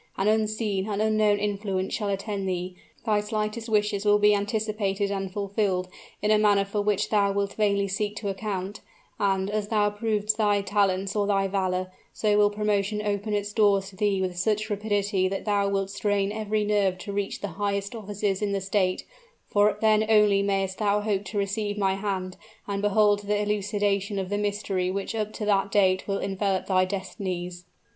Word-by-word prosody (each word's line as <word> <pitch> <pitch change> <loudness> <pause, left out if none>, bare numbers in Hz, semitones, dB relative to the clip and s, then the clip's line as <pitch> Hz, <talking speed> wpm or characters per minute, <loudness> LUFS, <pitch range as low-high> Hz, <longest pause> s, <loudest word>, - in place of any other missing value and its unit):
An 195 - +1
unseen, 215 -2 0
an 205 -1 -2
unknown 215 -1 +3
influence 200 -2 -2
shall 210 -3 -1
attend 195 0 -2
thee: 180 0 -3 0.3
thy 210 -2 +2
slightest 215 +2 -3
wishes 210 -2 +1
will 205 0 +5
be 210 0 +5
anticipated 205 -1 -1
and 195 -1 -3
fulfilled 200 -2 -1 0.3
in 210 - +3
a 215 - +5
manner 205 -2 +4
for 205 +1 -2
which 205 -1 0
thou 200 -2 +3
wilt 200 0 -1
vainly 200 -2 +1
seek 205 +1 -2
to 210 - -5
account, 195 0 -4 0.4
and, 195 -1 +1
as 210 -1 -1
thou 210 -1 +2
provest 210 0 0
thy 205 -2 +3
talents 195 -1 +1
or 205 -1 +1
thy 195 -1 +2
valor, 185 -1 -1 0.2
so 210 -1 +1
will 205 0 +5
promotion 210 0 0
open 205 +1 -1
its 205 0 -2
doors 200 -3 +3
to - - -16
thee 205 -1 +1
with 185 -1 -2
such 215 +3 0
rapidity 205 -2 0
that 195 +1 -4
thou 200 -2 +1
wilt 195 -1 -1
strain 205 -1 0
every 215 0 -1
nerve 200 -3 +1
to 200 +2 -7
reach 200 0 -2
the 205 - -3
highest 200 0 -1
offices 205 -2 -2
in 205 -1 0
the 200 - 0
state 190 -1 0 0.4
for 205 0 +3
then 215 -1 +4
only 210 -2 +5
may'st 195 -1 -1
thou 210 -1 +2
hope 205 -2 -1
to 210 - -5
receive 205 +1 -1
my 195 -2 +2
hand, 190 -2 -3 0.3
and 200 -1 -2
behold 205 0 +3
the 205 0 +1
elucidation 205 -1 0
of 190 -1 -3
the 205 - -1
mystery 200 -3 -1
which 195 +3 -3
up 215 -1 -2
to 215 - -5
that 200 -1 +2
date 190 -2 +2
will 195 -1 0
envelop 195 -1 -1
thy 185 -1 +3
destinies." 185 -2 -5
205 Hz, 185 wpm, -26 LUFS, 195-210 Hz, 0.4 s, will